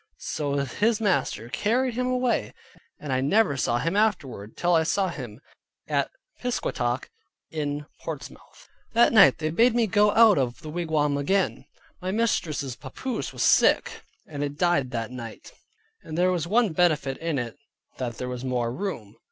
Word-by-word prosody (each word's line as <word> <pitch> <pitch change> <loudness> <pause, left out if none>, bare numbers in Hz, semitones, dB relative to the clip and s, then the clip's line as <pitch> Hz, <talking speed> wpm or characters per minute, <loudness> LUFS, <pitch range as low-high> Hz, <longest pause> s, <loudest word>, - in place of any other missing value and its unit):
So 145 -2 -3
his 205 - +1
master 185 - 0
carried 245 - 0
him 250 +2 -1
away, 255 -1 0 0.4
and 145 -3 -4
I 130 - +1
never 150 +3 +3
saw 120 -3 0
him 165 +9 -1
afterward, 140 - -1
till 175 0 +2
I 165 - +5
saw 185 +4 +1
him 120 -9 -7 0.5
at - - 0 0.3
Piscataqua 130 - -1 0.4
in 150 -2 -3
Portsmouth. - - -9 0.3
That 235 +1 +5
night 195 - +7
they 155 0 -2
bade 230 +7 +4
me 235 -1 +3
go 210 0 +3
out 220 -7 +6
of 125 -2 -2
the 155 - -6
wigwam 155 -4 0
again. 190 +7 0 0.4
My 185 - -3
mistress's 170 - -1
papoose 220 - -5
was - - -2
sick, - - +3 0.2
and 145 -2 -5
it 145 0 -4
died 175 -7 +2
that 115 -2 -4
night, 115 -3 -9 0.5
and 155 - -7
there 180 +1 +3
was 170 -3 -1
one 220 -1 +2
benefit 150 -6 +1
in 165 -3 -2
it 120 -3 -4 0.4
that 120 -2 -3
there 125 - -4
was 125 0 -5
more 120 -2 -1
room. 125 - -5
155 Hz, 165 wpm, -26 LUFS, 130-205 Hz, 0.5 s, night